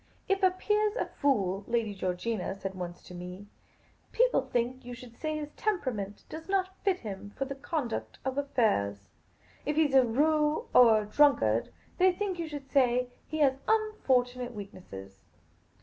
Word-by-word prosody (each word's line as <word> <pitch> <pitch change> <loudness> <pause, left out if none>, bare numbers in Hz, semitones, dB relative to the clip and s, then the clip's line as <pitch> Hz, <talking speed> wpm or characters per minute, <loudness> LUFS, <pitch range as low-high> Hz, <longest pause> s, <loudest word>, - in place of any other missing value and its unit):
" - - -36
If 390 - -3
a 375 - +6
peer 420 +3 +1
's 415 - -11
a - - 0
fool," 200 -8 0
Lady 230 -3 0
Georgina 190 +2 -2
said 195 -1 -5
once 180 -2 -7
to - - -12
me, 180 +3 -8 0.4
*' - - -35
people - - +4
think 245 +2 -2
you 245 0 -7
should 240 -1 -12
say 310 +4 -3
his 295 -1 -5
temperament 255 - -2
does 320 +3 -9
not 380 -1 0
fit 385 -3 +1
him 205 -1 -7
for 270 - -1
the 275 - -4
conduct 275 -3 -3
of 265 -1 -1
affairs; 155 - 0 0.5
if 295 - -1
he 315 0 +4
's 275 - -7
a 265 - +8
rou6 300 +5 +2
or 225 -3 +7
a - - -8
drunkard, 205 - +3 0.3
they 370 +1 +6
think 375 -1 -3
you 335 - -2
should 290 -3 -7
say 250 -2 +3 0.2
he 310 - -4
has 270 -2 +3
unfortunate 255 - +1
weaknesses." 100 - -10
255 Hz, 180 wpm, -30 LUFS, 205-310 Hz, 0.5 s, a